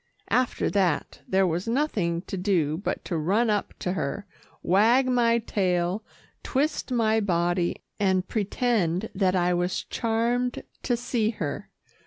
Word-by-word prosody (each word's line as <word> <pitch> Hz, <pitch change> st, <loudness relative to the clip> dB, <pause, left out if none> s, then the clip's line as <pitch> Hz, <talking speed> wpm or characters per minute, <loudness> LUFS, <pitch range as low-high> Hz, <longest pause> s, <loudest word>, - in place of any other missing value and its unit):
After 255 Hz, -1 st, +1 dB
that, 185 Hz, -7 st, 0 dB
there 190 Hz, 0 st, +3 dB
was 175 Hz, +2 st, -1 dB
nothing 210 Hz, -, 0 dB
to -, -, -6 dB
do 180 Hz, -6 st, +1 dB
but 195 Hz, -, -3 dB
to 175 Hz, -, -3 dB
run 200 Hz, +9 st, +2 dB
up 205 Hz, -1 st, -1 dB
to 180 Hz, -, -2 dB
her, 175 Hz, +4 st, -3 dB, 0.4 s
wag 225 Hz, +8 st, +4 dB
my 235 Hz, -2 st, +3 dB
tail, 185 Hz, -3 st, 0 dB, 0.4 s
twist 280 Hz, 0 st, -1 dB
my 225 Hz, -2 st, +2 dB
body, 175 Hz, -3 st, 0 dB, 0.2 s
and 190 Hz, -2 st, +1 dB
pretend 210 Hz, -3 st, 0 dB
that 190 Hz, -1 st, +1 dB
I 180 Hz, 0 st, +2 dB
was 175 Hz, +1 st, -1 dB
charmed 235 Hz, +2 st, -1 dB, 0.2 s
to 245 Hz, -2 st, 0 dB
see 235 Hz, -2 st, 0 dB
her. 165 Hz, -10 st, -4 dB
200 Hz, 140 wpm, -26 LUFS, 180-230 Hz, 0.4 s, wag